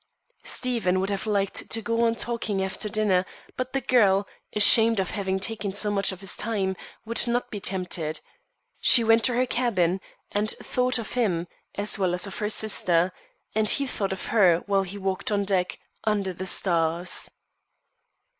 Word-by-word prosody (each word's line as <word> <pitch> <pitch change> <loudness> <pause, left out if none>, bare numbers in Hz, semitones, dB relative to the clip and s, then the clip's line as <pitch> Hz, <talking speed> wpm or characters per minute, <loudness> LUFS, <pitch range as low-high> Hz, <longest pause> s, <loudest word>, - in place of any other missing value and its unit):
Stephen 225 -8 -1
would 195 +2 -1
have 200 +2 -3
liked 200 -2 -1
to 225 - 0
go 230 +2 0
on 230 0 +1
talking 230 -4 -2
after 190 +2 -3
dinner, 205 -4 +1 0.3
but 255 0 -4
the 270 - -1
girl, 205 -6 +3 0.3
ashamed 225 +1 +6
of 190 - -2
having 190 -1 -2
taken 205 0 -3
up 190 - -4
so 210 0 +1
much 200 -1 +2
of 190 0 -9
his 195 - -1
time, 200 -4 -2 0.3
would 230 +2 +2
not 240 +1 -1
be 210 - -5
tempted. 175 -5 -3 0.6
She 235 - +7
went 225 0 +4
to 245 - +1
her 250 +1 +2
cabin, 195 -8 0 0.3
and 210 +1 0
thought 250 +2 0
of 230 -3 -6
him, 180 -9 0 0.3
as 205 +1 0
well 180 -2 +1
as 180 - -1
of 200 - -7
her 210 - -1
sister; 185 -5 +2 0.4
and 215 0 +2
he 280 - +4
thought 200 -7 -3
of 190 - -5
her 180 -7 +4
while 200 -1 +2
he 195 +1 -6
walked 195 +1 -3
on 200 -1 0
deck, 185 -2 -1 0.3
under 205 -4 -1
the 185 +2 -6
stars. 170 -1 +1
200 Hz, 180 wpm, -25 LUFS, 190-225 Hz, 0.6 s, She